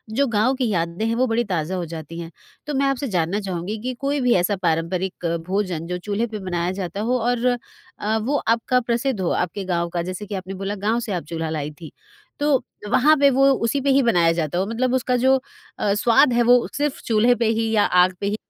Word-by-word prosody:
जो 280 Hz, +3 st, +3 dB
गाँव 230 Hz, +3 st, +2 dB
की 255 Hz, -2 st, 0 dB
यादें 170 Hz, +1 st, -1 dB
हैं 225 Hz, 0 st, 0 dB
वो 255 Hz, +2 st, +2 dB
बड़ी 230 Hz, +1 st, +1 dB
ताज़ा 180 Hz, -4 st, -2 dB
हो 180 Hz, -2 st, -3 dB
जाती 165 Hz, 0 st, -8 dB
हैं। 165 Hz, -1 st, -7 dB, 0.4 s
तो 295 Hz, -, -2 dB
मैं 275 Hz, 0 st, +1 dB
आपसे 275 Hz, 0 st, -1 dB
जानना 180 Hz, -1 st, 0 dB
चाहूँगी 190 Hz, +2 st, -4 dB
कि 255 Hz, +2 st, -3 dB
कोई 280 Hz, +1 st, -1 dB
भी 250 Hz, -1 st, +3 dB
ऐसा 180 Hz, +3 st, +2 dB
पारंपरिक 175 Hz, +2 st, -1 dB, 0.2 s
भोजन 185 Hz, -4 st, -2 dB
जो 180 Hz, 0 st, -3 dB
चूल्हे 205 Hz, +5 st, -2 dB
पे 215 Hz, -2 st, -6 dB
बनाया 175 Hz, -2 st, -2 dB
जाता 190 Hz, 0 st, -4 dB
हो 250 Hz, +3 st, +1 dB
और 240 Hz, +1 st, 0 dB, 0.5 s
अ, 215 Hz, +1 st, 0 dB
वो 240 Hz, +7 st, -1 dB
आपका 230 Hz, +2 st, +2 dB
प्रसिद्ध 240 Hz, 0 st, -1 dB
हो, 180 Hz, -, 0 dB
आपके 180 Hz, +3 st, -2 dB
गाँव 170 Hz, -2 st, -1 dB
का 170 Hz, 0 st, -2 dB
जैसे 185 Hz, +4 st, -5 dB
कि 205 Hz, 0 st, -5 dB
आपने 190 Hz, 0 st, -6 dB
बोला 195 Hz, +2 st, -4 dB
गाँव 225 Hz, +2 st, +2 dB
से 225 Hz, -4 st, -4 dB
आप 175 Hz, -, -2 dB
चूल्हा 165 Hz, -1 st, -3 dB
लाईं 150 Hz, -1 st, -4 dB
थीं। 160 Hz, -, -8 dB, 0.5 s
तो, 290 Hz, -1 st, +3 dB, 0.3 s
वँहा 290 Hz, +6 st, +5 dB
पे 280 Hz, -1 st, +5 dB
वो 270 Hz, +1 st, +4 dB, 0.2 s
उसी 235 Hz, +5 st, 0 dB
पे 280 Hz, -, 0 dB
ही 275 Hz, 0 st, +5 dB
बनाया 175 Hz, -8 st, +3 dB
जाता 160 Hz, 0 st, -1 dB
हो 185 Hz, -, +1 dB
मतलब 245 Hz, +3 st, -1 dB
उसका 255 Hz, -1 st, +1 dB
जो 260 Hz, +2 st, +4 dB, 0.4 s
अ, 200 Hz, -, +1 dB
स्वाद 245 Hz, +6 st, +4 dB
है 240 Hz, -, +3 dB
वो 245 Hz, 0 st, +4 dB
सिर्फ़ 290 Hz, -1 st, -1 dB
चूल्हे 230 Hz, +2 st, +3 dB
पे 235 Hz, -1 st, 0 dB
ही 225 Hz, 0 st, 0 dB
या 215 Hz, -2 st, +3 dB
आग 180 Hz, +1 st, +4 dB
पे -, -, -1 dB
ही 205 Hz, -, 0 dB
210 Hz, 235 wpm, -22 LUFS, 180-245 Hz, 0.5 s, वँहा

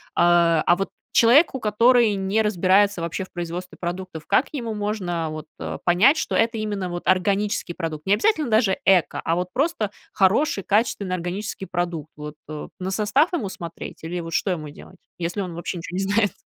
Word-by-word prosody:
А, 170 Hz, -2 st, +4 dB
а 175 Hz, -, +5 dB
вот 195 Hz, +2 st, -3 dB, 0.2 s
человеку, 265 Hz, +4 st, +5 dB
который 230 Hz, +1 st, +4 dB
не 195 Hz, +3 st, 0 dB
разбирается 195 Hz, -1 st, +3 dB
вообще 170 Hz, +3 st, -3 dB
в 185 Hz, -, -13 dB
производстве 175 Hz, +1 st, -6 dB
продуктов, 175 Hz, -2 st, -5 dB
как 275 Hz, -, +3 dB
ему 235 Hz, -6 st, -4 dB
можно 190 Hz, -6 st, -2 dB
вот, 155 Hz, 0 st, -7 dB
а, -, -, -5 dB
понять, 205 Hz, -, +5 dB
что -, -, -2 dB
это 230 Hz, 0 st, +2 dB
именно 205 Hz, -3 st, -3 dB
вот 175 Hz, 0 st, -6 dB
органический 195 Hz, 0 st, +1 dB
продукт, 160 Hz, -3 st, -5 dB
не 195 Hz, -, +3 dB
обязательно 305 Hz, -, +2 dB
даже 215 Hz, -3 st, +3 dB
эко, 190 Hz, -3 st, +3 dB
а 165 Hz, -, +1 dB
вот 180 Hz, +1 st, -1 dB
просто 270 Hz, -, 0 dB, 0.2 s
хороший, 195 Hz, +3 st, +2 dB
качественный, 200 Hz, -3 st, 0 dB
органический 185 Hz, +3 st, -4 dB
продукт, 170 Hz, -4 st, -3 dB
вот, 150 Hz, 0 st, -8 dB
а, 155 Hz, -1 st, -6 dB
на 185 Hz, +1 st, -3 dB
состав 240 Hz, -, +2 dB
ему 225 Hz, -, -1 dB
смотреть, 170 Hz, -3 st, -8 dB
или 175 Hz, +2 st, -4 dB
вот 165 Hz, -1 st, -6 dB
что 195 Hz, -, +1 dB
ему 155 Hz, -4 st, -4 dB
делать? 170 Hz, +5 st, -14 dB, 0.2 s
Если 175 Hz, +4 st, -3 dB
он 180 Hz, -3 st, -5 dB
вообще 175 Hz, +1 st, -4 dB
ничего 170 Hz, +2 st, -6 dB
не 195 Hz, -, 0 dB
знает? 205 Hz, +1 st, +2 dB
190 Hz, 185 wpm, -23 LUFS, 175-215 Hz, 0.2 s, а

